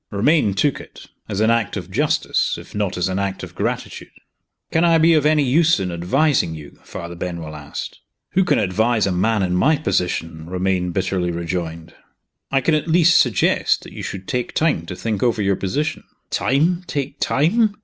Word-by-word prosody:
Romayne 105 0 +2
took 145 +6 +1
it - - -14 0.2
as 105 0 -2
an 110 +1 +4
act 115 -3 0
of 90 -1 -7
justice, - - 0
if - - -12
not 105 -3 -2
as 90 - 0
an 95 +1 -2
act 100 -1 -3
of - - -8
gratitude. - - -4 0.6
"Can 160 - +2
I 165 -1 +5
be 165 +1 +5
of 150 -2 +3
any 150 -1 +3
use 160 +5 +3
in 95 -2 -2
advising 90 - +1
you?" 75 -2 -12
Father 85 0 -7
Benwell 85 -3 -6
asked. 75 -1 -7 0.3
"Who 190 - +3
can - - +2
advise 110 +3 +1
a 100 - 0
man 100 +3 +1
in 90 -1 0
my 145 +12 +3
position?" 80 - -2
Romayne 90 0 -1
bitterly 95 -1 -1
rejoined. 85 -1 -4 0.6
"I 135 0 +2
can 160 - +1
at 155 +1 0
least 170 0 +5
suggest - - +1
that - - -12
you - - -7
should 95 0 -6
take 125 -1 -2
time 150 - +1
to 90 - -5
think 110 0 -3
over 120 -3 +1
your 100 -1 +2
position." 145 +12 -2 0.3
"Time? 165 +7 +1
take 140 0 -4
time? 205 - +2
105 Hz, 190 wpm, -20 LUFS, 90-150 Hz, 0.6 s, I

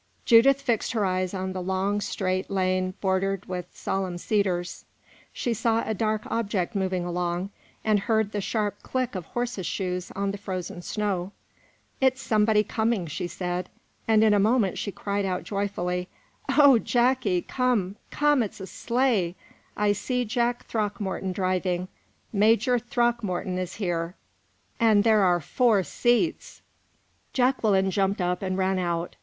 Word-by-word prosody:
Judith 265 +4 +6
fixed 240 -6 -1
her 215 -3 +1
eyes 185 -1 0
on 190 -1 -3
the 185 - -4
long, 190 +3 0
straight 185 -1 -2
lane 185 -1 0
bordered 195 0 0
with 180 -1 -5
solemn 190 -2 -3
cedars; 180 -3 -1 0.5
she 240 - -2
saw 230 0 +1
a 220 - -1
dark 215 +1 -1
object 210 -3 -1
moving 185 -3 -1
along, 175 +2 -2 0.3
and 215 -2 +3
heard 220 0 +1
the 205 - -2
sharp 205 0 -2
click 255 -1 -2
of 185 -4 -5
horses' 240 -7 -3
shoes 180 -2 -3
on 200 0 -1
the 200 - -7
frozen 185 -3 -5
snow. 195 -1 -2 0.7
"It's 260 0 +3
somebody 215 -2 +3
coming," 220 -3 0
she 165 +2 -4
said, 180 0 -3 0.4
and 220 -1 +5
in 215 -1 +5
a 205 - +4
moment, 210 -2 +2
she 200 - -3
cried 200 +1 -2
out 185 -2 -2
joyfully: 180 -3 -2 0.4
"O 280 -5 +6
Jacky, 240 -7 +1
come 235 -7 0
come! 295 -2 +3
it's 210 -3 -4
a 190 - -6
sleigh 230 -6 0 0.4
I 210 0 +3
see 250 +4 -1
Jack 240 +2 -1
Throckmorton 205 -3 -2
driving 185 -1 -1 0.4
Major 225 +4 +3
Throckmorton 235 -7 -1
is 185 -1 -5
there 175 -3 -2 0.6
and 215 -3 +5
there 220 -2 +4
are 180 -2 +4
four 215 - +2
seats!" 240 - 0 0.7
Jacqueline 220 -7 +2
jumped 195 +1 +1
up 180 0 0
and 185 -1 -2
ran 190 0 +1
out. 170 -1 -2
200 Hz, 150 wpm, -26 LUFS, 185-225 Hz, 0.7 s, Judith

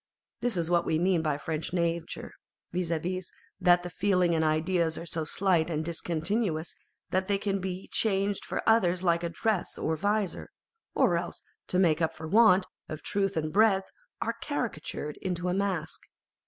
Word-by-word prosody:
This 240 -5 +1
is 170 -2 +1
what 170 -1 +4
we 160 - +1
mean 175 0 +2
by 150 -3 0
French 160 +2 -4
nature, 170 -1 -2 0.4
viz., 180 -1 -1 0.7
that 175 -1 +5
the 180 - -5
feelings 180 -2 +2
and 160 -1 +2
ideas 160 +1 +1
are 170 - -6
so 165 -1 -2
slight 175 -2 +2
and 155 -1 -2
discontinuous 170 +1 -2 0.4
that 185 0 +1
they 200 -1 +2
can 195 0 -1
be 185 0 -4
changed 200 -2 +1
for - - -4
others 185 -5 +3
like 170 -2 +3
a 170 - -1
dress 195 +3 -1
or 160 - 0
vizor 205 +2 -1 0.3
;' 455 - -54
or - - +4
else, - - -5 0.2
to 180 - 0
make 170 -3 +3
up 160 - 0
for 160 0 -7
want 195 -1 +6 0.2
of 155 -1 -6
truth 200 -2 0
and 155 -1 -1
breadth, 200 -2 +3 0.3
are 230 - -1
caricatured 175 - -3
into 180 -1 -2
a - - +1
mask. 185 -5 -1
180 Hz, 175 wpm, -29 LUFS, 160-195 Hz, 0.7 s, want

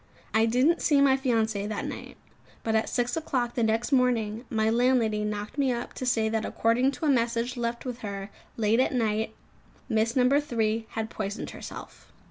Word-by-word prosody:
I 220 +1 +4
didn't 255 +9 +3
see 290 -3 +3
my 275 -1 +5
fiancée 225 -6 0
that 215 - -3
night: - - -7 0.5
but 225 - 0
at 220 0 +1
six 245 0 0
o'clock 255 -7 -1
the 240 - -1
next 225 +3 +1
morning, 240 -3 +1
my 220 -4 +1
landlady 230 -2 +2
knocked 210 +5 -4
me 270 -2 +3
up 240 0 -4
to 255 - -5
say 225 -3 +2
that 220 0 -1
according 230 +5 +2
to 295 - -4
a - - +3
message 235 0 0
left 235 0 -3
with 250 -1 -5
her 200 -2 -6 0.3
late 225 +1 +2
at 260 - +2
night 220 -1 0 0.5
Miss 225 +1 +1
No. 250 -1 +4
2 230 -6 +1
had 220 0 -4
poisoned 205 +1 -4
herself. - - -10
230 Hz, 185 wpm, -27 LUFS, 220-250 Hz, 0.5 s, my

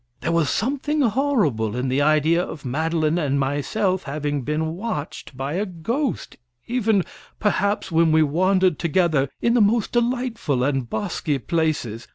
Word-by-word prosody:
There - - -1
was 165 -4 +2
something 285 +5 0
horrible 210 - +1
in 125 +1 -1
the 130 +2 +1
idea 155 +3 +3
of 150 -6 -8
Madeline 160 +4 0
and 140 -3 0
myself 175 +8 0
having 145 -1 -3
been 155 +4 -2
watched 165 - -5
by 135 +2 -3
a 195 +5 0
ghost, 225 - -3 0.3
even, 225 -5 +1 0.4
perhaps, 200 -2 0
when 165 0 +3
we 160 0 +5
wandered 185 +3 +2
together 160 -5 +1
in 235 - +3
the 240 - +4
most 215 +1 +2
delightful 240 - 0
and 135 -3 -1
bosky 160 - -2
places. 135 -6 -2
165 Hz, 150 wpm, -22 LUFS, 145-210 Hz, 0.4 s, we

